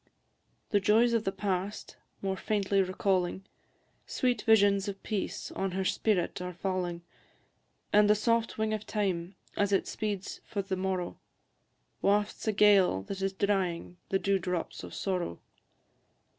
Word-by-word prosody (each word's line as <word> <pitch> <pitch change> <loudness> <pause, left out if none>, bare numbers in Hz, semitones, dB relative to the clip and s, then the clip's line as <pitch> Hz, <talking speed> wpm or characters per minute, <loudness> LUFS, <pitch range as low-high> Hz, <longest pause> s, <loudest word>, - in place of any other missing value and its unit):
The 205 - +4
joys 225 +4 +4
of 230 -2 +1
the 195 - +1
past, 195 0 -3 0.3
more 190 -1 0
faintly 200 -1 +1
recalling, 185 0 0 0.6
Sweet 245 -4 0
visions 205 -2 +4
of 195 -1 -6
peace 210 -4 -3
on 195 -1 -2
her 190 0 -1
spirit 185 -3 0
are 180 -1 -5
falling, 180 -2 -2 0.9
And 210 0 +6
the 210 - +6
soft 230 +1 +1
wing 220 0 0
of 215 -1 -4
time, 190 -3 -1 0.2
as 205 0 +1
it 195 - +2
speeds 205 -3 -4
for 200 -2 -3
the 190 0 -2
morrow, 185 -1 -2 0.8
Wafts 205 +2 +1
a - - +4
gale, 200 - +5
that 195 - -6
is 195 0 0
drying 190 -3 -1
the 195 - +2
dew 195 0 +1
drops 180 -1 -3
of - - -8
sorrow. 180 - -2
195 Hz, 145 wpm, -30 LUFS, 185-210 Hz, 0.9 s, And